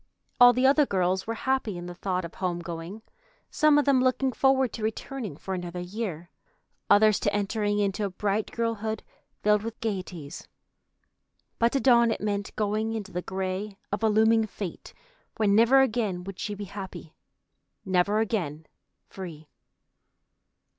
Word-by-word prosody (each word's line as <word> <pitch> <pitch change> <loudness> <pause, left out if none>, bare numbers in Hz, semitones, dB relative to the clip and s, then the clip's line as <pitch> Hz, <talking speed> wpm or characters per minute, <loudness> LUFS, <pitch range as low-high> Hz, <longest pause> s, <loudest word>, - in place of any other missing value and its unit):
All 245 0 +10
the 250 +2 +1
other 285 +1 +5
girls 185 0 0
were 230 - -2
happy 260 -7 -1
in 175 - -7
the 175 - -6
thought 185 0 -2
of 165 - -9
home 180 -2 -2
going, 170 +5 -7 0.5
some 305 -1 +4
of 295 - +3
them 270 -2 +4
looking 260 +1 +2
forward 265 +1 +2
to 230 - -6
returning 220 - -4
for 190 - -5
another 180 -1 -5
year, 180 -3 -5 0.6
others 210 0 +5
to 205 - 0
entering 205 0 0
into 205 0 0
a - - -2
bright 205 +3 -1
girlhood 225 -2 -2 0.4
filled 210 0 +4
with 230 +1 -6
gaieties. 180 -7 -5 1.1
But 235 +1 +3
to 275 - +2
Dawn 235 -3 +5
it 225 - -1
meant 205 -1 -3
going 215 +1 -1
into 210 -3 -5
the 180 - -3
gray 190 +2 -4
of 205 - -2
a 220 - +3
looming 220 +1 +4
fate 195 -3 -7 0.5
where 215 - +2
never 230 +6 +6
again 215 -8 0
would 195 0 -8
she 205 - -3
be 205 0 -6
happy, 190 -5 -8 0.7
never 190 +2 +2
again 165 -9 -2 0.4
free. 160 -5 -9
205 Hz, 160 wpm, -27 LUFS, 185-225 Hz, 1.1 s, All